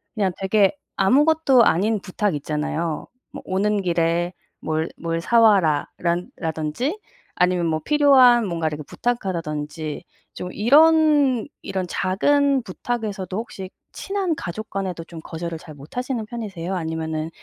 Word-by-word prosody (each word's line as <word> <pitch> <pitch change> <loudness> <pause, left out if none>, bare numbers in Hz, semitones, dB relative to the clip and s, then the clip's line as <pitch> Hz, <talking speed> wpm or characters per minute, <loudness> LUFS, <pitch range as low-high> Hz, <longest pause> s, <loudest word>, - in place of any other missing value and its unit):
그냥 200 -4 +1
되게 195 +4 +3 0.2
아무것도 275 +4 +4
아닌 210 +6 +2
부탁 200 0 -1
있잖아요. 155 +2 -3 0.3
뭐 - - -9
"오는 205 +2 0
길에 170 0 0 0.3
뭘 160 +1 -1
뭘 165 0 -2
사와라."라 180 -6 +3 0.2
라던지 160 - -2 0.4
아니면 180 -1 +2
뭐 155 -1 0
필요한 265 -5 +5
뭔가를 165 -3 -2
이렇게 150 - -8
부탁한다든지 160 -9 -3 0.3
좀 180 - -6
이런 290 - +4
이런 190 -1 -3
작은 275 +10 +2
부탁에서도 200 -2 -4
혹시 195 -5 -6 0.2
친한 390 -4 -2
가족 215 - -6
간에도 185 -4 -4
좀 165 -1 -10
거절을 165 0 -5
잘 155 0 -12
못하시는 235 - -4
편이세요? 195 -6 -5
아니면은 160 -2 -3
190 Hz, 300 characters per minute, -22 LUFS, 165-240 Hz, 0.4 s, 필요한